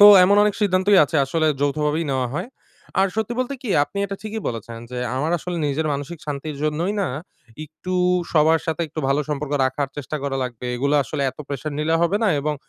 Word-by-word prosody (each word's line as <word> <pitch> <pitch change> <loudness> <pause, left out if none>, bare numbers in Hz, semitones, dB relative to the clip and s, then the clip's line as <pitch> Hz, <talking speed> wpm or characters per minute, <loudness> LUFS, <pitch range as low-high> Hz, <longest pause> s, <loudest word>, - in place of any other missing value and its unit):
তো 205 - +11 0.2
এমন 200 +2 +4
অনেক 210 -1 +2
সিদ্ধান্তই 195 0 +4
আছে, 155 - -2
আসলে 155 +3 0
যৌথভাবেই 150 +3 +1
নেওয়া 130 -1 0
হয়। 180 +9 -3 0.5
আর 195 - +5
সত্যি 220 +2 -1
বলতে 255 +2 -2
কি? 240 - -5 0.2
আপনি 200 - -7
এটা 195 - -5
ঠিকই 220 +1 -4
বলেছেন 115 0 -6
যে 125 - -4 0.2
আমার 155 +6 0
আসলে 175 +2 -4
নিজের 150 +2 -1
মানসিক 145 +4 -4
শান্তির 145 0 -4
জন্যই 160 +6 0
না, 195 - 0 0.6
একটু 155 +4 -6 0.4
সবার 160 0 +4
সাথে 160 0 -1
একটু 155 - -5
ভালো 140 +2 +2
সম্পর্ক 150 -1 -3
রাখার 130 +2 -1
চেষ্টা 145 +2 -4
করা 135 -1 -1
লাগবে। 125 -1 -5
এগুলা 140 +4 +2
আসলে 140 +4 -3
এত - - -26
প্রেশার 145 +1 -4
নিলে 160 +2 +1
হবে 170 +4 +2
না, - - +4
এবং 150 +1 -1
155 Hz, 205 wpm, -22 LUFS, 140-185 Hz, 0.6 s, তো